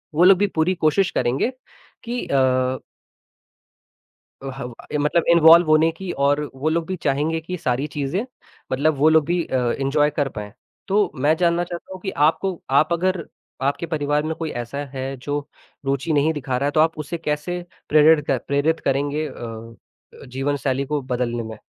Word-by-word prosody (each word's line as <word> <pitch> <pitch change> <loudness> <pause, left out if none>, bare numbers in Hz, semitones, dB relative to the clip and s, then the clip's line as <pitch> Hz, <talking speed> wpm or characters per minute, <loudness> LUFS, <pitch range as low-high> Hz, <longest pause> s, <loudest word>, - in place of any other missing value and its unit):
वो 170 - +4
लोग 185 0 +7
भी 205 +1 +2
पूरी 160 +4 +2
कोशिश 175 +4 +2
करेंगे 130 - 0 0.5
कि 240 +1 -3
अ 130 -1 +1 1.6
अ, - - -5
ह 135 0 -7
ब 120 - -10 0.2
ये 150 - 0
मतलब 150 +3 +2
इन्वॉल्व 170 0 +7
होने 155 +1 +5
की 175 +2 -6
और 145 +1 +3 0.2
वो 145 +4 -1
लोग 165 0 0
भी 185 - -2
चाहेंगे 150 +4 0
कि 180 +3 -5
सारी 135 -2 -1
चीज़ें, 150 - -1 0.5
मतलब 145 +3 +2
वो 155 +3 +5
लोग 160 -2 +4
भी 175 +1 0
अ, - - -3
एन्जॉय 135 +4 +1
कर 145 -2 -1
पाएँ। 105 -1 -6 0.4
तो 200 0 +2
मैं 145 +4 +2
जानना 170 0 +2
चाहता 175 +2 -8
हूँ 185 - -8
कि 190 - -3 0.2
आपको 190 +1 -4 0.2
आप 155 +2 +2
अगर 180 0 0 0.4
आपके 140 +5 0
परिवार 150 -2 0
में 160 0 -2
कोई 160 -1 -4
ऐसा 120 +4 -8 0.2
है 130 0 -4
जो 145 +3 -3 0.5
रुची 140 +3 -1
नहीं 150 +2 +2
दिखा 130 -3 -2
रहा 140 - -1
है - - 0
तो 155 - +1
आप 160 0 +3
उसे 155 +3 -4
कैसे 160 +3 -3 0.3
प्रेरित 155 0 +6
क 135 - +2
प्रेरित 145 +3 +1
करेंगे 145 +3 -1
अ, 115 -3 -8 0.5
जीवनशैली 135 +1 -1
को 150 +1 -2
बदलने 120 -2 -2
में? 110 -1 -8
150 Hz, 180 wpm, -22 LUFS, 135-165 Hz, 1.6 s, लोग